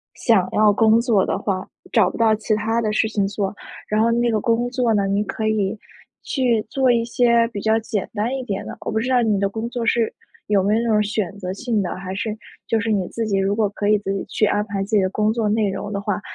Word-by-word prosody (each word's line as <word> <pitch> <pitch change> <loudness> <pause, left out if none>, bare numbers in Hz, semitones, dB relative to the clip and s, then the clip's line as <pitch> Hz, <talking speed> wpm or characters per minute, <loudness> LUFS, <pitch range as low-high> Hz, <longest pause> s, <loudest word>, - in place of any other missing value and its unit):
想 200 -6 +2
要 215 0 +4
工 220 +1 +4
作 230 -5 +2
的 - - -1
话， 185 -2 -3 0.2
找 210 -6 +4
不 - - -8
到 225 -1 +4
其 215 0 -1
他 225 +2 0
的 215 -2 0
事 220 +1 +1
情 205 -2 0
做， 200 0 -3 0.3
然 215 +1 +1
后 230 +1 +3
那 235 +1 +2
个 215 - +1
工 235 +2 +1
作 245 -2 +1
呢， 200 -2 +1
你 200 +1 +1
可 215 0 -3
以 215 -1 0 0.5
去 240 -5 0
做 260 +1 +2
一 235 -1 +2
些 235 -1 +3
比 205 -4 -6
较 220 0 +2
简 215 -2 -3
单 225 +5 -1
一 265 - -4
点 200 -6 -4
的。 - - -7
我 - - -4
不 220 - 0
知 250 - -2
道 250 -1 +3
你 215 -4 +1
的 200 - +1
工 225 +3 -4
作 240 -1 -3
是 230 -1 +1 0.3
有 200 -2 +2
没 205 +2 +2
有 225 - +1
那 235 - -1
种 210 -1 +3
选 205 -2 -3
择 185 -2 -4
性 225 0 -1
的， 180 - -3
还 185 0 -6
是 215 +2 -3 0.3
就 225 - +1
是 225 0 -1
你 195 -4 0
自 230 - -3
己 200 -2 +1
如 195 +1 +1
果 215 -2 +1
可 205 +1 -3
以 210 0 +4
自 195 -1 -4
己 195 - -3
去 215 - 0
安 210 0 0
排 200 -2 -3
自 210 +3 -2
己 205 - +5
的 185 - +1
工 215 +2 +1
作 225 -1 -1
内 215 -1 +1
容 205 +2 -5
的 200 - -2
话 205 -1 -2
215 Hz, 290 characters per minute, -21 LUFS, 200-230 Hz, 0.5 s, 己